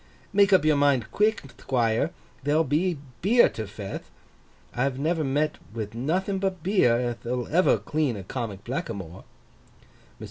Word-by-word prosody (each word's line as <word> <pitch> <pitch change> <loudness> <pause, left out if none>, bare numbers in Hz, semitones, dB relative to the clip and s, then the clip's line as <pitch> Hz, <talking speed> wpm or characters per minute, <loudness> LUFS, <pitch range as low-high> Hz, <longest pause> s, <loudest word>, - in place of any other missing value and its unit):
Make 200 0 +5
up 185 -5 +5
your 155 -2 +4
mind 140 -5 +2
quick, 215 +1 +2 0.2
Thquire. 115 -3 +1 0.3
There'll 150 +3 +3
be 160 +4 0 0.2
beer 230 +8 +5
to 110 -2 -6
feth. 100 -1 -7 0.6
I've 130 +1 0
never 160 +3 0
met 150 +2 0 0.2
with 110 -2 -4
nothing 180 - -1
but 190 -3 -2
beer 175 - +3
ath'll 120 0 -2
ever 180 +4 +4
clean 150 -7 -1
a 95 - -7
comic 105 -2 -5
blackamoor.' 100 -8 -5
Mr. - - -30
140 Hz, 145 wpm, -26 LUFS, 115-175 Hz, 0.6 s, Make